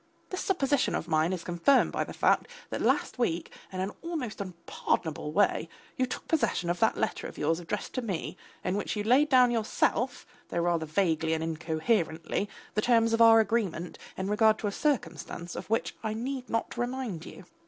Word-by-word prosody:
This 370 - -2
supposition 285 -7 +1
of - - -3
mine 160 +1 +2
is 180 -2 -3
confirmed 175 +11 +3
by - - 0
the - - -8
fact - - +2 0.2
that - - -2
last - - +1
week 175 -8 0 0.2
in 185 - -5
an 190 +2 -2
almost 290 -12 -4
unpardonable 170 -4 -2
way 205 +6 +2 0.3
you 255 -1 +1
took - - -6
possession 230 - +1
of 175 - -3
that - - +3
letter - - -1
of - - -11
yours 165 +3 +1
addressed 170 - -4
to 255 - -1
me, 195 -8 -3 0.3
in 185 - 0
which 205 - -2
you 210 - -1
laid 260 +7 +4
down 250 -2 +6
yourself, 235 +2 0 0.2
though - - -4
rather 170 -2 +1
vaguely 160 -2 +1
and 160 - -2
incoherently, 165 +3 -1 0.2
the 215 - +1
terms 230 -1 +3
of 230 - +3
our 225 0 +8
agreement 205 -6 -1 0.2
in 190 - -2
regard 215 +1 +4
to - - -5
a 205 - 0
circumstance 175 - -2
of - - -7
which 225 - 0
I 220 -1 -2
need 255 +2 -4
not 230 +1 -2
remind 245 -8 -3
you. - - -11
210 Hz, 190 wpm, -29 LUFS, 170-245 Hz, 0.3 s, our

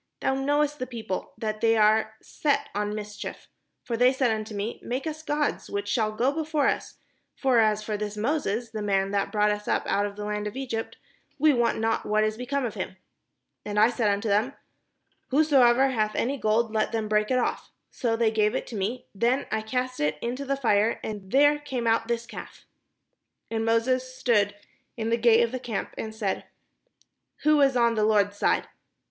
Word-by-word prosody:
Thou 265 - +1
knowest 290 +2 0
the 255 - -3
people, 225 -6 -5
that 215 -2 -3
they 225 0 +4
are 220 +1 +3
set 290 -2 -1
on 210 +1 -2
mis 210 -1 -6
chief. - - -7 0.4
For 235 - -3
they 250 +2 +5
said 260 -3 +1
unto 215 -1 -3
me, 205 +3 -3
' - - -23
Make 255 +5 -3
us 310 -1 -4
gods, 295 -1 -1
which 200 0 -3
shall 215 0 +1
go 240 +5 +1
before 310 -1 -1
us; - - -2 0.4
for 260 -4 +3
as 215 -1 +2
for 210 -1 -3
this 210 0 -4
Moses, 235 -2 -1
the 215 -2 -4
man 195 -1 +1
that 200 -1 0
brought 210 -1 +2
us 210 0 -4
up - - +1
out 205 +1 +1
of 200 - -9
the 210 0 -5
land 210 0 -2
of 210 - -6
Egypt, 240 -4 -4 0.4
we 305 +1 +5
wot 240 -2 +2
not 225 0 0
what 215 0 +2
is 215 0 0
be 250 +2 -7
come 280 -1 0
of 225 - -3
him.' 190 -2 -5 0.7
And 210 0 -1
I 220 +3 +5
said 230 -3 +1
unto 205 +2 0
them, 215 +6 +1 0.7
'Whosoever 270 -3 +4
hath 215 -4 0
any 265 +4 0
gold, 220 +1 +1
let 215 -1 +1
them 220 -2 -1
break 210 0 +1
it 255 - +2
off.' 250 - -1 0.2
So 230 -2 -1
they 225 -1 +2
gave 215 -1 +1
it - - -4
me; 215 +5 -3
then 240 +7 +1
I 220 - 0
cast 250 +3 -3
it 150 0 0
into 250 - -4
the 275 0 -1
fire 220 -3 +2
and 205 -3 -6
there 290 +2 +5
came 265 -5 -4
out 225 0 +2
this 235 0 -1
calf." 230 - -10 0.9
Then 225 0 -1
Moses 255 +3 +1
stood 210 -6 +2 0.4
in 225 0 -2
the - - +4
gate 235 0 +5
of 230 - -1
the 255 - -3
camp, 235 -5 -4
and 220 0 -6
said: 205 -4 -2 1.0
"Who 305 -1 +4
is 270 -2 +4
on 235 -1 +3
the 215 -1 +1
Lord's 205 -1 +3
side? - - +1
225 Hz, 205 wpm, -26 LUFS, 210-255 Hz, 1.0 s, they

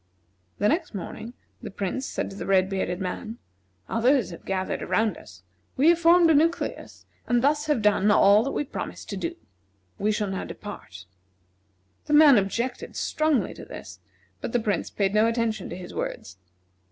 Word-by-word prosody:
The 205 - +2
next 320 - 0
morning, 225 +5 -7 0.3
the - - -6
Prince 200 +7 -3
said - - -4
to - - -9
the - - -6
red 190 -1 +3
bearded 185 -2 -2
man: 215 +5 -5 0.5
"Others 240 -1 +2
have 170 - -11
gathered 190 -1 -2
around 220 -5 +1
us. 95 -2 -14 0.3
We 290 +5 +5
have 340 0 +4
formed 340 0 +6
a - - +5
nucleus, 325 +3 -1 0.2
and 240 0 +2
thus 295 +2 +2
have 290 -8 +1
done 210 0 +3
all 205 0 +6
that 275 - -2
we - - -1
promised 285 - -7
to 200 - -3
do. 170 -3 -3 0.6
We 210 +1 +1
shall 210 -2 -1
now 190 - -3
depart." 100 - -9 1.0
The 300 - -2
man 295 -6 +8
objected 235 +6 -3
strongly 310 -4 0
to - - -11
this, - - -10 0.4
but - - -5
the 245 - +3
Prince 215 -3 -1
paid 195 -1 -1
no 215 +1 +4
attention 230 -3 -1
to - - -6
his 180 -1 -9
words. 85 - -5
215 Hz, 175 wpm, -25 LUFS, 195-275 Hz, 1.0 s, man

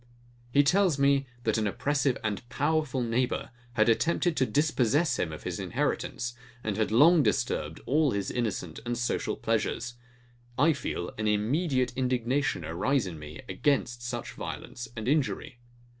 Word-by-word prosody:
He 145 +2 +5
tells 180 +1 +3
me, 140 -1 +3 0.2
that 110 -1 +1
an 105 - +1
oppressive 135 +4 +1
and 105 -2 -1
powerful 145 -3 0
neighbour 120 +2 -1 0.2
had 110 -1 +3
attempted 170 +8 +2
to 130 -1 +3
dispossess 145 -1 +2
him 80 - 0
of 80 - -8
his - - -4
inheritance, 120 0 -2 0.3
and 105 -2 -1
had 110 0 +1
long 155 +8 +7
disturbed - - 0
all 150 +3 +3
his 100 -4 -2
innocent 100 -9 -2
and 120 0 -2
social 120 +1 -1
pleasures. 120 0 -1 0.6
I 160 +4 +5
feel 90 -10 -4
an 110 - 0
immediate 125 - +1
indignation 130 +2 0
arise 125 +11 +1
in 85 -4 -6
me 75 +1 -9
against 120 +4 0
such 120 0 -4
violence 120 - -6
and 110 - -4
injury. 135 -3 0
125 Hz, 150 wpm, -29 LUFS, 110-145 Hz, 0.6 s, long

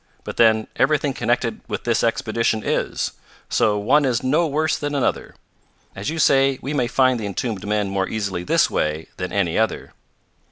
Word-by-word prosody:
But - - -7
then 110 -1 +4
everything - - +2
connected - - -1
with - - -4
this - - +1
expedition 115 -2 0
is; - - -1 0.4
so 105 -1 +2
one 130 +9 +3
is 125 -3 0
no 155 +6 +2
worse 155 +2 0
than 145 0 -3
another. 140 - -1 0.6
As 100 - -4
you 160 - -4
say, 135 -3 +3
we 140 +3 -4
may 125 -5 +1
find 130 0 +2
the 105 - -3
entombed 105 0 -4
men 105 -1 0
more 95 -1 -1
easily 100 -5 -3
this - - +3
way 75 +1 -2
than 90 0 -4
any 95 -2 0
other." 110 -1 -1
110 Hz, 175 wpm, -21 LUFS, 100-135 Hz, 0.6 s, then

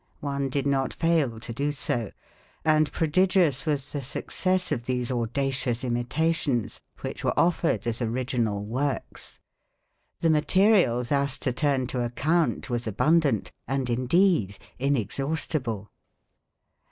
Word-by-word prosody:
One 140 -2 -2
did 140 +1 -1
not 135 -2 0
fail 155 -9 +1
to 115 +1 -6
do 145 +5 -1
so; 120 -6 -2 0.6
and 155 -1 +3
prodigious 165 -3 +2
was 145 -3 -1
the 145 - -3
success 185 +7 -1
of 120 0 -2
these 125 -1 -1
audacious 125 +1 -1
imitations 130 +1 0 0.2
which - - -5
were - - +1
offered 170 -4 +2
as 115 +1 -2
original 115 -3 -1
works. 130 +5 -4 0.8
The 165 - +4
material 160 - +3
thus 140 +2 0
to 125 - +1
turn 135 -1 +1
to 125 0 -2
account 155 +8 0
was 120 -2 -2
abundant, 140 +1 +2 0.2
and 135 -1 -1
indeed 130 - +2 0.2
inexhaustible. 135 - -2
135 Hz, 120 wpm, -26 LUFS, 120-155 Hz, 0.8 s, The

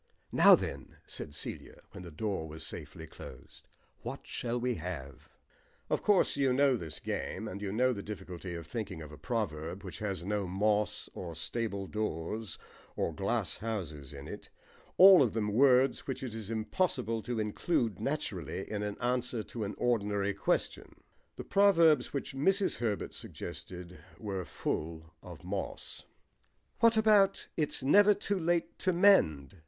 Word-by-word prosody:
"Now - - +8
then," - - -6
said 75 - -4
Celia, - - -6
when - - -9
the 90 - -8
door 90 0 -3
was 80 +1 -6
safely - - -7
closed, 65 - -12 0.3
"what - - -6
shall 120 0 -2
we 125 +1 0
have?" 80 -6 -7 0.6
Of - - +1
course 205 -3 +3
you 135 -2 +2
know 135 0 +4
this 80 - -5
game, - - -4
and 100 +2 -6
you 100 -2 -3
know 125 +4 +2
the 100 - -5
difficulty 90 -4 -7
of 85 -1 -7
thinking 95 -8 -5
of 75 - -10
a 75 - -10
proverb 95 - -3
which 95 - -7
has 95 -4 -3
no 100 -1 -1
moss 105 +3 0
or 85 -3 -6
stable 100 +3 -3
doors 105 -1 -3 0.4
or - - -1
glasshouses 85 - -3
in 70 0 -9
it; - - -8 0.5
all 190 -2 +10
of 125 -5 +2
them 105 -2 0
words 130 +1 +4
which 135 -1 -4
it 125 -4 -4
is 110 -2 -6
impossible 115 0 -1
to 120 0 -3
include 110 - 0
naturally 95 - -3
in 105 -1 -2
an 105 -1 -3
answer 125 -2 0
to 115 0 -6
an 100 0 -4
ordinary 100 -4 +1
question. 100 - -1 0.4
The - - -6
proverbs 170 -9 +4
which 140 - -4
Mrs. 195 +9 +2
Herbert 110 -4 -2
suggested 90 0 -8 0.2
were 95 -4 -4
full 80 +1 -4
of 90 -1 -11
moss. 95 +2 -5 0.7
"What 230 -1 +5
about 210 -3 +4
'It's 150 -4 0
never 205 +9 +6
too 200 -1 -2
late 170 0 0
to 185 - +1
mend?'" 95 - +4
105 Hz, 155 wpm, -31 LUFS, 90-130 Hz, 0.7 s, all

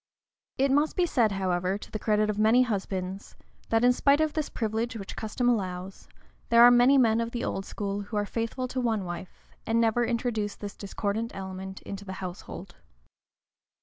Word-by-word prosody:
It 270 +1 +2
must 295 +3 +2
be 360 - +3
said, 235 -10 +2
however, 185 0 0
to - - -12
the 215 - -4
credit 215 0 +2
of 210 0 -2
many 225 +4 +5
husbands, 195 -3 -4 0.3
that 225 +1 +2
in 250 0 +6
spite 280 +3 +3
of 310 -1 +1
this 310 -2 -2
privilege, 225 +1 -2
which 200 -3 -7
custom 225 +3 -2
allows, 190 -5 -2 0.4
there 235 0 +7
are 245 - +9
many 245 +3 +6
men 230 -3 +4
of 230 - -2
the 240 0 -4
old 195 - -3
school 200 0 -3
who 205 +1 -5
are 205 - +1
faithful 230 +4 -3
to 255 0 -2
one 220 -5 0
wife, 175 +1 -8 0.2
and 225 +1 +2
never 230 +1 +2
introduce 230 -3 -1
this 205 -1 -7
discordant 205 +3 -3
element 190 0 -7
into 200 0 -7
the 190 -1 -7
household. 185 -2 -8
220 Hz, 185 wpm, -28 LUFS, 195-240 Hz, 0.4 s, are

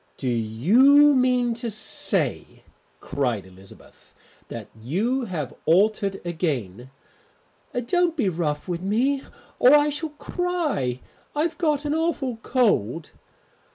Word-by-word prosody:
"Do 135 - -4
you 205 - +5
mean 250 -2 +2
to 235 0 -4
say," 215 0 -1 0.4
cried 125 -8 -2
Elizabeth, 95 +1 -17 0.3
"that - - -8
you 225 - -1
have 160 - -5
altered 195 +3 +2
again?" 130 - -3 1.0
"Don't 350 +4 +1
be 235 -9 +1
rough 160 -4 -2
with 175 -1 -3
me 245 +8 +1 0.4
or 255 +4 +7
I 295 0 +4
shall 300 +2 -4
cry. 310 - -2 0.3
I've 320 +3 -1
got 300 -4 0
an 295 - 0
awful 310 -7 -1
cold." 200 - 0
220 Hz, 115 wpm, -24 LUFS, -, 1.0 s, or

